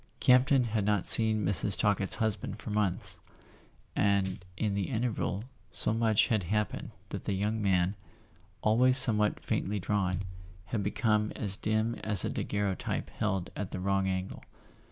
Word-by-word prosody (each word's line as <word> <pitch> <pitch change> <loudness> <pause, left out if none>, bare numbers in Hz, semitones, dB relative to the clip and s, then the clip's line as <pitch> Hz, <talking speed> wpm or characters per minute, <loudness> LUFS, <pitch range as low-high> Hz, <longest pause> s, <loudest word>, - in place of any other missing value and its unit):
Campton 130 +1 +3
had 110 -3 -2
not 105 -2 -1
seen 110 -2 +6
Mrs. 100 0 0
Talkett's 100 -2 0
husband 110 -2 -3
for 110 - -9
months, 100 -2 -3 0.8
and 95 -2 -1
in 105 0 -2
the 100 -1 -3
interval 110 -4 -3 0.3
so - - +1
much 110 -2 +1
had 110 -3 0
happened 105 +4 -3 0.2
that - - -7
the 100 - -2
young 105 +3 -2
man, 95 -2 0 0.7
always 125 +4 +4
somewhat 105 -5 +8
faintly 105 +1 -2
drawn, 95 -1 -2 0.4
had 105 +1 -4
become 105 +1 -1
as 100 -3 -5
dim 110 +2 -2
as 105 -3 +2
a - - -3
daguerreotype 100 -2 -4
held 95 -4 -3
at 100 -3 -5
the - - -6
wrong 95 +1 -1
angle. 95 0 -5
105 Hz, 150 wpm, -29 LUFS, 95-110 Hz, 0.8 s, somewhat